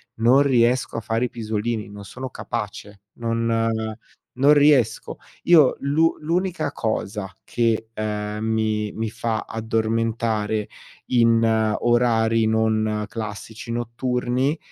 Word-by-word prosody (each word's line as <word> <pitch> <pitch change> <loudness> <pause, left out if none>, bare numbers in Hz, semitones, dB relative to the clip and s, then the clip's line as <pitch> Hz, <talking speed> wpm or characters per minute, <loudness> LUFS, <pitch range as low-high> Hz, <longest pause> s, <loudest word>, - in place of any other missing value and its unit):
non 125 +5 +4
riesco 125 -2 +2
a - - -2
fare 115 +3 -1
i - - -3
pisolini, 110 -1 -3
non 100 0 -10
sono 130 +6 -7
capace, 105 -4 -6
non 115 -1 0 0.7
non 140 +3 +6
riesco. 145 -7 +3 0.3
Io 155 -6 +6
l'u 155 +4 +2
l'unica 180 +3 -1
cosa 105 -3 -3
che, 115 -2 0
ehm, 105 0 -3
mi 110 -1 0
mi 110 -1 -3
fa 110 -1 -2
addormentare 110 -1 -1 0.4
in 115 -2 +3 0.4
orari 115 -2 +2
non 110 -1 +1
classici 110 +1 -7
notturni, 125 +4 -1
115 Hz, 110 wpm, -23 LUFS, 110-120 Hz, 0.7 s, non